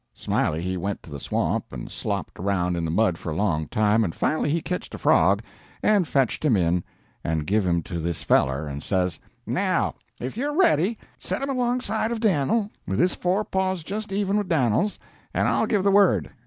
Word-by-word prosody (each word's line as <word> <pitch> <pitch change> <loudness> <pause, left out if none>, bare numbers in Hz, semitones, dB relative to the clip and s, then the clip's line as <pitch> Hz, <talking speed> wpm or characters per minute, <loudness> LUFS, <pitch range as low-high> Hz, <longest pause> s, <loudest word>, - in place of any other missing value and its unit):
Smiley 80 +2 -1
he 95 0 -2
went 100 +3 -3
to 80 - -13
the 70 - -6
swamp - - -1
and - - -7
slopped - - -4
around 90 -2 0
in 85 -1 -2
the - - -2
mud 90 0 +2
for 80 - -5
a - - -3
long 80 -6 0
time, 105 +4 +2
and 85 -6 -2
finally 155 -1 0
he 165 +3 +1
ketched 180 +3 -4
a - - -6
frog, - - +3 0.4
and 200 -5 +3
fetched 135 0 +1
him 130 -9 +4
in, 85 -1 +1 0.4
and 80 -2 -1
give 100 +2 +1
him 85 -2 +1
to 85 0 -5
this 85 0 -3
feller 65 +3 +2
and 70 -1 -5
says: 90 -1 -1 0.3
"'Now, - - +1 0.3
if 130 - -5
you're 290 +4 -1
ready, 220 - +3 0.2
set - - -3
him 275 - -1
alongside 245 -3 0
of 235 - -2
Dan'l, 205 - +1 0.2
with 95 +1 -1
his 180 - +3
fore 190 +4 0
paws 190 -2 -1
just 210 +4 -5
even 200 +1 +1
with 205 -3 -4
Dan'l's, 140 - +2 0.4
and - - +2
I'll - - +2
give 205 -3 +1
the 200 - +4
word.' 190 - +4
125 Hz, 205 wpm, -25 LUFS, -, 0.4 s, him